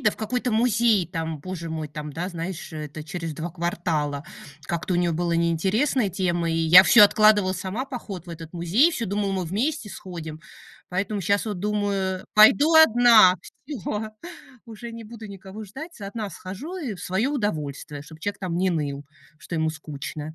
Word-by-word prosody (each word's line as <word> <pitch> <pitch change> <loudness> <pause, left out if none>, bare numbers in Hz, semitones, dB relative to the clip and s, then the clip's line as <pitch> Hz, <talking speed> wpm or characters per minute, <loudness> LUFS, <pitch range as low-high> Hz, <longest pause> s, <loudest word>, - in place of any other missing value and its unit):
да, 215 -5 +2
в - - -12
какой-то 245 +2 -2
музей, 225 -4 +3
там, 165 -3 -4
боже 170 -1 -6
мой, 160 -2 -4
там, 150 0 -7
да 175 +5 -3
знаешь, 175 0 -6
э, 155 -1 -5
это 150 +1 -8
через 165 0 -5
2 165 +3 -5
квартала. 165 -4 -2 0.4
Как-то 170 +7 -2
у - - +2
нее 175 -1 +1
было 170 +1 -1
неинтересная 190 - +1
тема, 175 -2 -1
и 165 - 0
я 165 +3 +8
всё 235 - +8
откладывала 205 -2 +5
сама 190 +8 -4
поход 205 - -7
в - - -9
этот 165 0 -9
музей, 190 - +3
всё 235 -7 -2
думала, 200 0 -1
мы 185 -1 -1
вместе 220 - -2
сходим. 160 -4 -8 0.5
Поэтому 200 +3 -2
щас 200 +3 +1
вот 205 -4 -3
думаю 200 -2 -1
пойду 275 +9 +6
одна. 235 -10 +7 0.3
Всё! 215 - -4 0.5
Уже 230 +1 -9
не 230 0 -8
буду 225 0 -10
никого 195 +2 -9
ждать, 290 - -10
одна 205 +1 -5
схожу 245 - -7
и 270 - -4
в 180 - -12
свое 190 +8 0
удовольствие, 150 - -3
чтобы 160 +1 -14
человек 205 +3 -3
там 180 -3 -3
не 185 +1 +1
ныл, 145 -3 -3 0.3
что 170 -2 -6
ему 160 0 +1
скучно. 155 0 -7
185 Hz, 180 wpm, -24 LUFS, 165-215 Hz, 0.5 s, я